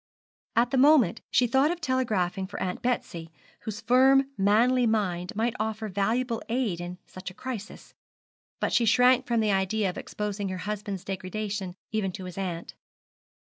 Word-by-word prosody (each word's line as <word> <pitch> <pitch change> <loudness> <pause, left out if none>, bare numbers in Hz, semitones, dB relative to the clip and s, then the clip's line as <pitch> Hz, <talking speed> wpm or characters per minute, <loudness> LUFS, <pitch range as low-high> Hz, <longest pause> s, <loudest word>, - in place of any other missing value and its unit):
At 235 +2 +3
the 265 - +2
moment 280 -4 +5
she 250 - +3
thought 265 +5 +3
of 345 0 -2
telegraphing 215 - 0
for 200 - -7
Aunt 180 -1 -3
Betsy, 175 -9 -2 0.4
whose 215 -1 -5
firm 265 +3 +4
manly 235 +5 +3
mind 185 -5 0
might 225 +2 0
offer 220 0 -2
valuable 225 +5 0
aid 225 -8 -1
in 175 +1 -6
such 185 0 -8
a 180 - -14
crisis; 230 -5 -7 0.7
but - - -1
she 235 - +4
shrank 250 +3 +4
from 235 -2 +2
the 215 -1 +2
idea 195 +1 +1
of - - -8
exposing 205 -1 -4
her 185 - -4
husband's 205 -2 -4
degradation 195 0 -4 0.2
even 210 -4 -1
to 190 - -7
his 180 +1 -7
aunt. 175 -3 -4
215 Hz, 165 wpm, -27 LUFS, 190-245 Hz, 0.7 s, moment